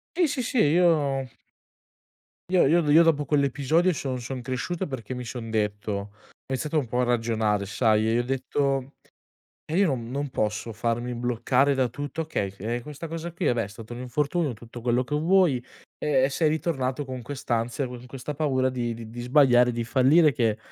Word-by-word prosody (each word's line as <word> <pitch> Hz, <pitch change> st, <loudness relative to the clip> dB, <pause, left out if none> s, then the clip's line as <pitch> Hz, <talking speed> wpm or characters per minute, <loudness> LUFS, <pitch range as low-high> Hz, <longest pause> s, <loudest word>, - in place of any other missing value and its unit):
Sì, 350 Hz, -2 st, +3 dB
sì, 265 Hz, -3 st, -2 dB
sì, 255 Hz, +2 st, -2 dB
io 150 Hz, -5 st, +3 dB, 1.3 s
io 185 Hz, -, +5 dB
io 170 Hz, +3 st, +4 dB
io 165 Hz, +3 st, +8 dB
dopo 155 Hz, -3 st, +3 dB
quell'episodio, 150 Hz, +5 st, +2 dB
son 130 Hz, -3 st, -3 dB
son 125 Hz, +1 st, -5 dB
cresciuto, 130 Hz, +9 st, -3 dB
perché 130 Hz, -, -6 dB
mi 125 Hz, 0 st, -5 dB
son 115 Hz, -1 st, -6 dB
detto 105 Hz, -1 st, -1 dB
ho 100 Hz, 0 st, -3 dB, 0.4 s
iniziato 150 Hz, +4 st, -1 dB
un 140 Hz, -6 st, 0 dB
po' 125 Hz, +2 st, -1 dB
a -, -, +3 dB
ragionare, 110 Hz, -4 st, 0 dB
sai, 110 Hz, +1 st, +2 dB
e -, -, +1 dB
i -, -, +3 dB
ho 120 Hz, -, +1 dB
detto: 135 Hz, +1 st, -1 dB, 0.7 s
"Eh, 160 Hz, -, -3 dB
io 200 Hz, -, +5 dB
non 120 Hz, -5 st, -2 dB
non 140 Hz, +1 st, -3 dB
posso 110 Hz, 0 st, -2 dB
farmi 120 Hz, +2 st, -2 dB
bloccare 125 Hz, +3 st, +1 dB
da 130 Hz, -2 st, +2 dB
tutto 145 Hz, +5 st, -5 dB
okay, 130 Hz, -11 st, -2 dB
eh, 115 Hz, +5 st, -3 dB
questa 150 Hz, +4 st, -8 dB
cosa 165 Hz, +1 st, -5 dB
qui, 175 Hz, +1 st, -4 dB
vabbè, 120 Hz, -4 st, +2 dB
è 100 Hz, -, -6 dB
stato 110 Hz, +2 st, -10 dB
un 120 Hz, -, -7 dB
infortunio, 145 Hz, +3 st, -1 dB
tutto 115 Hz, +2 st, -11 dB
quello 120 Hz, +1 st, +1 dB
che 125 Hz, -, -6 dB
vuoi, 160 Hz, -5 st, +3 dB, 0.4 s
e 135 Hz, -3 st, +2 dB
e 135 Hz, -, +3 dB
sei 155 Hz, +2 st, +1 dB
ritornato 145 Hz, -4 st, -1 dB
con 130 Hz, -1 st, -6 dB
quest'ansia, 120 Hz, 0 st, -2 dB
con 125 Hz, 0 st, -9 dB
questa 135 Hz, +3 st, -6 dB
paura 135 Hz, -3 st, +1 dB
di 120 Hz, -3 st, -4 dB
di 120 Hz, +2 st, -7 dB
sbagliare, 125 Hz, -1 st, +5 dB
di 120 Hz, 0 st, -2 dB
fallire 140 Hz, +6 st, +4 dB
che 115 Hz, -3 st, +1 dB
130 Hz, 190 wpm, -26 LUFS, 120-150 Hz, 1.3 s, io